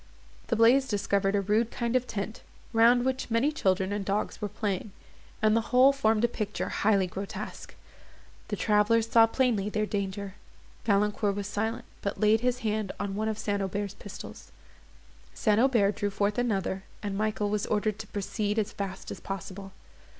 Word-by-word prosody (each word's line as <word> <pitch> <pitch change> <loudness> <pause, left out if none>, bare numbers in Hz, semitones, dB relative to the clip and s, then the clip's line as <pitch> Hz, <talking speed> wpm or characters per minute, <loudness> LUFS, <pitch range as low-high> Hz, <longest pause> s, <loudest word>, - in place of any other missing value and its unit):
The 235 - +1
blaze 245 +4 +5
discovered 200 -2 +1
a 200 - +2
rude 215 +4 +1
kind 235 0 -2
of 250 0 +1
tent, 215 +2 -4 0.3
round 240 +2 +5
which 260 -1 -1
many 235 +6 +2
children 190 -8 +1
and 205 -1 -2
dogs 200 +3 -2
were 210 - -2
playing, 200 0 -3 0.5
and 215 0 +5
the 230 0 0
whole 260 +2 +6
formed 220 -5 +2
a - - +6
picture 215 -3 -3
highly 200 -2 +2
grotesque. 190 +2 -7 0.7
The - - -2
travellers 215 +1 +3
saw 230 0 +6
plainly 225 -4 +1
their 215 0 0
danger. 200 -1 -3 0.5
Valancourt 205 -1 +2
was 200 -1 -3
silent, 220 +3 -2 0.2
but 200 - -3
laid 215 +1 +4
his 250 0 0
hand 215 -2 -1
on 200 -1 -2
one 215 +2 -1
of 220 -1 -1
St. 205 -2 -1
Aubert's 195 +1 -2
pistols; 205 - -10 0.8
St. 210 -1 +2
Aubert 230 -6 +3
drew 205 - 0
forth 205 +2 0
another, 195 -5 -1 0.2
and 200 -2 -3
Michael 210 0 -1
was 210 -1 -1
ordered 215 0 0
to 220 - -7
proceed 205 +1 -2
as 215 -1 0
fast 195 -1 -5
as - - -6
possible. 195 0 -7
210 Hz, 170 wpm, -28 LUFS, 200-225 Hz, 0.8 s, whole